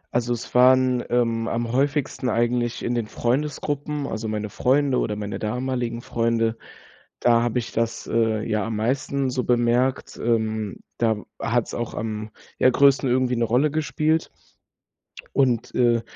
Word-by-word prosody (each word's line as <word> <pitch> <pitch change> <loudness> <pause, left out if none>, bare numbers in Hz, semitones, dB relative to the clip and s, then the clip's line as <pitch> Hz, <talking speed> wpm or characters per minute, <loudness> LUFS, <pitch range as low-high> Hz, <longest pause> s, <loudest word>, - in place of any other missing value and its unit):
Also, 120 0 +1
es 115 - -7
waren, 130 0 +5
ähm, 115 -2 +1
am 115 0 -2
häufigsten 135 -1 0
eigentlich 120 +1 0
in 120 - 0
den 115 -3 -1
Freundesgruppen, 145 +3 -2
also, 110 -2 -4
meine 105 -1 -3
Freunde 135 0 +2
oder 105 - -1
meine 105 -1 -5
damaligen 120 +1 -2
Freunde, 115 -1 0 0.6
da 115 -1 +4
habe 120 +1 -1
ich 115 - -6
das, 115 0 -2
äh, 110 -1 +1
ja 105 -2 0
am 115 -1 -3
meisten 130 +4 -1
so 125 -1 -1
bemerkt, 120 +2 +1
ähm. 110 -3 0 0.2
Da 110 -2 +2 0.2
hat's 120 0 0
auch 120 -1 -4
am, 110 0 -4 0.3
ja, 130 - +6
größten 135 0 +4
irgendwie 125 0 +2
'ne 120 - +1
Rolle 130 +6 +2
gespielt. 155 +1 0 1.0
Und, 125 -4 +1
äh, 120 -2 +3
120 Hz, 150 wpm, -23 LUFS, 115-130 Hz, 1.0 s, ja